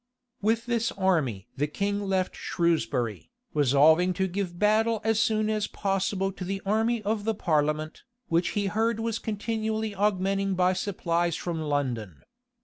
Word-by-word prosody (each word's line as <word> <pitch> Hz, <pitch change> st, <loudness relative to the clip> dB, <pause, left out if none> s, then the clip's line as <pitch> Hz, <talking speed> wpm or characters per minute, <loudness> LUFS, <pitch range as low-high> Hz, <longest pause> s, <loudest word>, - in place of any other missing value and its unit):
With 225 Hz, +3 st, +1 dB
this 235 Hz, -1 st, 0 dB
army 160 Hz, -, 0 dB
the 145 Hz, +1 st, 0 dB
king 200 Hz, +6 st, -1 dB
left 190 Hz, -2 st, -1 dB
Shrewsbury, 125 Hz, -, -1 dB, 0.2 s
resolving 155 Hz, +5 st, +4 dB
to 190 Hz, +2 st, 0 dB
give 185 Hz, -1 st, -3 dB
battle 215 Hz, +3 st, +3 dB
as 225 Hz, 0 st, +2 dB
soon 215 Hz, -1 st, +2 dB
as 215 Hz, -1 st, 0 dB
possible 195 Hz, 0 st, -1 dB
to 190 Hz, -, -8 dB
the 195 Hz, +2 st, -3 dB
army 220 Hz, +3 st, +1 dB
of 210 Hz, 0 st, -1 dB
the 220 Hz, +1 st, 0 dB
parliament, 155 Hz, -3 st, 0 dB, 0.3 s
which 170 Hz, +1 st, +1 dB
he 205 Hz, -, +1 dB
heard 225 Hz, +3 st, 0 dB
was 230 Hz, 0 st, -2 dB
continually 220 Hz, 0 st, -2 dB
augmenting 195 Hz, -1 st, +1 dB
by 180 Hz, 0 st, +3 dB
supplies 175 Hz, -3 st, -1 dB
from 170 Hz, -2 st, -3 dB
London. 130 Hz, -, -2 dB
195 Hz, 145 wpm, -27 LUFS, 165-215 Hz, 0.3 s, resolving